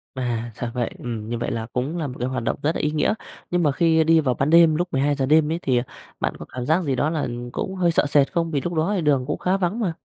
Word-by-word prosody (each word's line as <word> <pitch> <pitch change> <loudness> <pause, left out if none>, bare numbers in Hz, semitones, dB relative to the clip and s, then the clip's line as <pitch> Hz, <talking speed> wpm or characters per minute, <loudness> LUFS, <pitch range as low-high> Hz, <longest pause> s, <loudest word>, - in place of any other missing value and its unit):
À, 120 -2 -2
ra 120 -1 -4
vậy. 120 -2 -1
Ừm, 115 -3 -5
như 120 - -2
vậy 120 - -3
là 110 -1 -3
cũng 135 +7 -2
là 160 -4 -2
một 125 - -7
cái 125 - -1
hoạt 130 -3 -3
động - - 0
rất 155 +3 +1
là - - -1
ý 150 - 0
nghĩa. 150 +4 +1 0.4
Nhưng 175 0 +2
mà 145 - +3
khi 160 +2 +3
đi 165 +1 +5
vào 130 -5 +1
ban 140 +2 0
đêm 165 -1 +6
lúc 175 +3 0
12:00 140 0 +1
đêm 155 +2 +4
ấy 165 - -1
thì, 130 -6 +1
à, 120 - +1 0.4
bạn - - -1
có - - -7
cảm 125 -1 -4
giác 165 +4 +2
gì 140 -4 0
đó 145 +4 +1
là 160 -3 -1 0.2
cũng 190 - -4
hơi 175 -2 +2
sợ 165 - +2
sệt 145 -1 +3
không? 165 -1 -1
Vì 145 -3 0
lúc 175 - -3
đó 165 +5 +1
thì 185 - 0
đường 140 -5 +2
cũng 150 - -2
khá 185 +2 +1
vắng 190 +4 -1
mà. 185 -8 0
150 Hz, 305 wpm, -23 LUFS, 130-165 Hz, 0.4 s, đêm